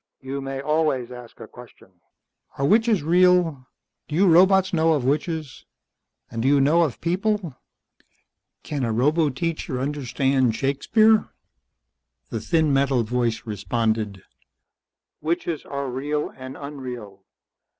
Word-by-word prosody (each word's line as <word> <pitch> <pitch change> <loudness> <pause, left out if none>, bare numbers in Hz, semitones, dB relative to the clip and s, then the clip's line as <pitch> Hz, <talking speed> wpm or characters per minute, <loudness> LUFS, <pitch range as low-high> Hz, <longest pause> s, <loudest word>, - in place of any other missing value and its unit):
"You 135 +1 -5
may 135 0 -5
always 150 -4 0
ask 125 -2 -11
a - - -9
question." 120 -5 -16 0.7
"Are 140 - 0
witches 220 +1 +3
real? 175 -5 +3 0.4
Do 150 - -5
you 190 +4 +4
robots 190 +2 +5
know 160 -1 +3
of 140 -5 -1
witches? 155 +1 -2 0.7
And 115 - -3
do 125 - 0
you 140 0 +4
know 150 +5 +4
of 155 -8 -1
people? 185 -2 -1 1.1
Can 145 -3 -3
a 115 - 0
roboteacher 145 +2 0
understand 135 -3 0
Shakespeare?" 215 - +2 1.0
The 115 - -2
thin 155 +5 +1
metal 135 -3 +2
voice 120 0 -1
responded. 105 -1 -2 1.0
"Witches 165 0 -2
are 140 -1 -4
real 145 +4 -3
and 130 0 -9
unreal. 125 -9 -8
140 Hz, 120 wpm, -23 LUFS, 125-165 Hz, 1.1 s, robots